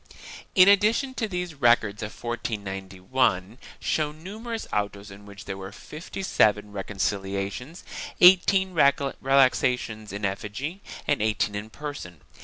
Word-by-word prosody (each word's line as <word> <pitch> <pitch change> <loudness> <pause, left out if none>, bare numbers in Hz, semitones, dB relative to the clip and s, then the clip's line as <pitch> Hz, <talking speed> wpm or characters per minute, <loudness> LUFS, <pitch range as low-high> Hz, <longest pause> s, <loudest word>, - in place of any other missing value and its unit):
In 185 0 +8
addition 215 +7 +4
to 230 -4 -2
these 180 -3 -3
the 150 - -17
records 120 -5 +3
of 105 0 -7
1491 100 -1 -2 0.2
show 150 -1 0
numerous 215 +9 -6
autos 100 -1 -2
in 100 +1 -13
which 100 0 -11
there 95 -1 -5
were 95 0 -8
fifty 155 - -8
seven 105 - +2
reconciliations, 100 - -3 0.4
eighteen 190 +1 +6
relaxations 135 -6 +2
in 100 +1 -3
effigy 110 - -4 0.3
and 145 - +1
eighteen 105 -1 0
in 105 +2 -5
person. 125 - -8
120 Hz, 125 wpm, -26 LUFS, 100-160 Hz, 0.4 s, In